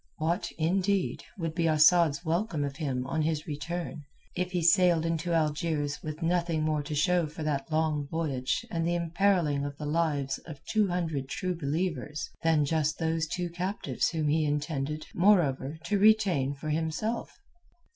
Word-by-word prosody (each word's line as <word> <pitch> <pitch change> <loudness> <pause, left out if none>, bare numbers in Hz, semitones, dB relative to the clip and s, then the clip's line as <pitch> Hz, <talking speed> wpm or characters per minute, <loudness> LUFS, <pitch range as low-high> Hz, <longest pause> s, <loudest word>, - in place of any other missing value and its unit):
What, 170 +4 -1
indeed, 185 +4 0
would 165 -3 -3
be 165 -1 +1
Asad's 155 +1 +4
welcome 165 -1 0
of 140 0 -4
him 135 -5 -2
on 155 +4 -1
his 155 -1 -1
return 165 +2 -4 0.3
if 180 0 -1
he 180 -2 -1
sailed 175 -2 +4
into 165 +1 -1
Algiers 150 -2 0
with 155 +2 -6
nothing 170 -2 +1
more 155 -1 +1
to 150 +1 -5
show 175 +1 +2
for 155 +1 -7
that 145 -1 -2
long 155 -2 0
voyage 140 -5 -1
and 165 -1 -1
the 175 - +1
imperilling 170 -4 +1
of 145 0 -5
the 150 - -6
lives 145 -4 0
of 155 -4 -10
two 215 -2 +2
hundred 160 -7 -2
True 185 +4 -2
Believers 155 -1 -3
than 160 -3 +3
just 155 0 0
those 160 -1 0
two 175 +1 -3
captives 180 - -1
whom 160 -3 -1
he 155 +2 +2
intended, 150 0 -2
moreover, 160 -7 +3
to 205 -1 +1
retain 195 -10 +4
for 145 +2 -6
himself? 160 +9 -2
160 Hz, 165 wpm, -29 LUFS, 150-175 Hz, 0.3 s, Asad's